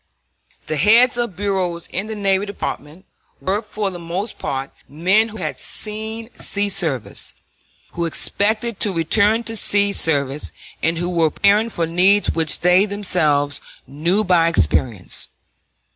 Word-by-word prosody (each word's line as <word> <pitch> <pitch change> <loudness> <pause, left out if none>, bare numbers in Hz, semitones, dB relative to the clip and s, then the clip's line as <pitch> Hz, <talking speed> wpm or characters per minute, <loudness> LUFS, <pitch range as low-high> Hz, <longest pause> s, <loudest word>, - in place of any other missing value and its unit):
The 155 - -3
heads 230 - +5
of 235 -6 -3
bureaus 185 -3 -2
in 195 +4 -3
the 220 - -5
Navy 200 -1 0
Department 170 -4 -7 0.3
were 200 +3 -1
for 210 -2 -4
the 175 - -8
most 175 +6 -5
part 135 0 -4 0.2
men 190 +9 +2
who 220 - -10
had - - -5
seen 220 +2 -2
sea 205 0 +2
service, 135 - -2 0.6
who 170 - -3
expected 215 +6 -1
to 210 - +1
return 205 +7 +2
to 225 -1 -2
sea 205 -1 +5
service, 140 -4 +1 0.3
and 165 +1 0
who 175 +1 -2
were 165 -2 +2
preparing 205 +7 +2
for 170 -6 -2
needs 185 +5 +3
which 160 -1 +1
they 180 +3 +4
themselves 155 -8 +1 0.2
knew 170 +9 0
by 175 -4 +3
experience. 115 - 0
190 Hz, 145 wpm, -19 LUFS, 165-210 Hz, 0.6 s, heads